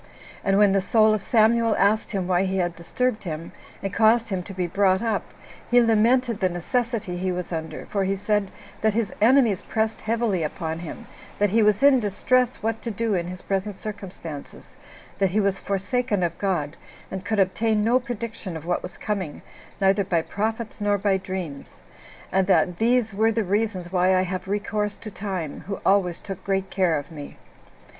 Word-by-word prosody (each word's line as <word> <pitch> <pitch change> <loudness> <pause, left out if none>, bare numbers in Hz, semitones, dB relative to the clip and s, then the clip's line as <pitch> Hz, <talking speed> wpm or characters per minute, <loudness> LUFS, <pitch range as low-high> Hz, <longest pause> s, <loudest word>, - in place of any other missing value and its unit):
And 195 0 +2
when 205 -1 +5
the 195 - +3
soul 215 +2 +4
of 215 - -1
Samuel 225 +1 +3
asked 205 +2 +2
him 190 -4 -2
why 180 0 +2
he 190 0 -1
had 175 -2 0
disturbed 215 +7 -1
him, 165 -2 -5 0.3
and 195 -1 -3
caused 225 +2 +4
him 190 -3 -1
to 180 - -9
be 180 -1 -1
brought 190 +2 +2
up, 225 -1 0 0.5
he 245 - +6
lamented 230 0 +3
the 185 - +2
necessity 205 +1 -2
he 185 +1 -1
was 180 0 -4
under; 160 0 -5
for 200 -2 -1
he 195 +1 0
said, 205 0 0 0.3
that 220 -1 +2
his 220 -4 0
enemies 230 -4 +4
pressed 220 0 -2
heavily 225 -5 0
upon 160 +1 -3
him; 170 -2 -8 0.3
that 205 -2 +2
he 225 +2 +4
was 210 +2 +3
in 280 -2 +7
distress 245 +4 +1
what 225 0 -1
to 235 - -4
do 225 0 -1
in 175 -2 -1
his 185 0 -6
present 195 +1 -2
circumstances; 185 -8 -8 0.4
that 195 -1 +3
he 200 +4 +1
was 200 -2 +1
forsaken 200 +1 -1
of 170 -1 -1
God, 170 -7 -1 0.3
and 190 -1 -5
could 215 +1 -1
obtain 210 +3 +2
no 240 +4 +4
prediction 230 -7 -5
of 160 - -10
what 175 +1 0
was 180 - -8
coming, 190 -8 -4 0.4
neither 195 +1 +3
by 175 -4 0
prophets 220 +3 -3
nor 205 0 +2
by 195 -1 +2
dreams; 185 -7 -6 0.5
and 190 0 +2
that 180 -2 +3
"these 230 -1 +2
were 220 +3 +3
the 225 0 0
reasons 195 -3 -1
why 185 0 +3
I 185 - +3
have 185 0 -4
recourse 210 +1 -2
to 215 - -9
time, 190 -7 -4
who 200 - -4
always 190 -3 +3
took 195 -3 -7
great 195 -1 -1
care 180 -5 +2
of 145 +2 -7
me." 145 -3 -9
200 Hz, 190 wpm, -24 LUFS, 185-220 Hz, 0.5 s, in